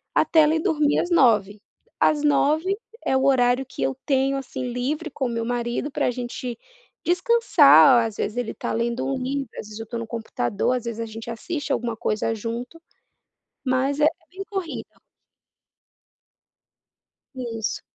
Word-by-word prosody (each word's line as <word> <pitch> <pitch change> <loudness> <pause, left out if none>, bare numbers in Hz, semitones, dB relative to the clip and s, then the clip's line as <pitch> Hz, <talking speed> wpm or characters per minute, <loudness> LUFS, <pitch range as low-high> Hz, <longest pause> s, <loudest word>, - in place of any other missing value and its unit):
até 320 - +4
ela 305 +1 +3
ir 320 - 0
dormir 295 -2 +2
às 355 - -1
21:00, 215 - +3 0.4
às 300 -1 +3
21:00 310 +6 +2 0.3
é 265 - +2
o 265 - 0
horário 255 -1 +3
que - - -9
eu 270 - +1
tenho, 275 -1 +1
assim, 255 -1 -5
livre 290 +7 -2
com 265 - -3
o 245 - -1
meu 230 -1 -2
marido 240 +4 -2
pra - - 0
gente 245 -1 -5 0.5
descansar, 350 - +6
ou 230 - 0
às 215 - -9
vezes 215 +4 -3
ele 245 -2 -2
tá - - -4
lendo 235 +1 -1
um 270 -1 -1
livro, 270 +1 -3
às - - -6
vezes 215 +1 -9
eu 225 - -6
estou 235 +2 -5
no 230 - -4
computador, 220 - -1
às 250 - -3
vezes 230 -1 -4
a 230 - -2
gente 225 +1 -8
assiste 290 +6 -3
alguma 235 -2 -2
coisa 215 +2 -1
junto, 235 +8 -6 0.9
mas 265 +2 +1
é 305 - +6 0.2
bem 390 +2 -6
corrido. 380 -5 -5 2.5
Isso. 230 -4 -4
255 Hz, 165 wpm, -23 LUFS, 230-290 Hz, 2.5 s, descansar